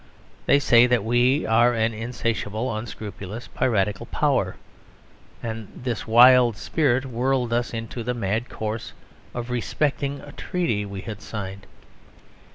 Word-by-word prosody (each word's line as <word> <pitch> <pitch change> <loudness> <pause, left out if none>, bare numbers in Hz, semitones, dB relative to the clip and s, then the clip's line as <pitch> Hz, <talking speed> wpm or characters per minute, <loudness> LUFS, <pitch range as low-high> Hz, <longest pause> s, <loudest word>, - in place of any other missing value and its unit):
They - - +6
say 125 -3 +5
that 125 -4 +2
we 120 +6 +2
are 120 +2 +4
an 115 0 +1
insatiable, 115 0 -2
unscrupulous, 110 -1 -7
piratical 105 -4 0
power; - - +1 0.9
and 110 -2 -5
this 120 -3 -4
wild 120 0 +7
spirit 135 -4 +1
whirled 125 -1 0
us 120 0 0
into 115 +1 -5
the 125 +2 -2
mad 110 +2 -2
course 110 +1 -5 0.4
of 120 0 -4
respecting 140 +3 -1
a 145 - -11
treaty 130 - -2
we 100 -1 -6
had 105 -1 -7
signed. 95 -2 -7
115 Hz, 130 wpm, -24 LUFS, 110-125 Hz, 0.9 s, wild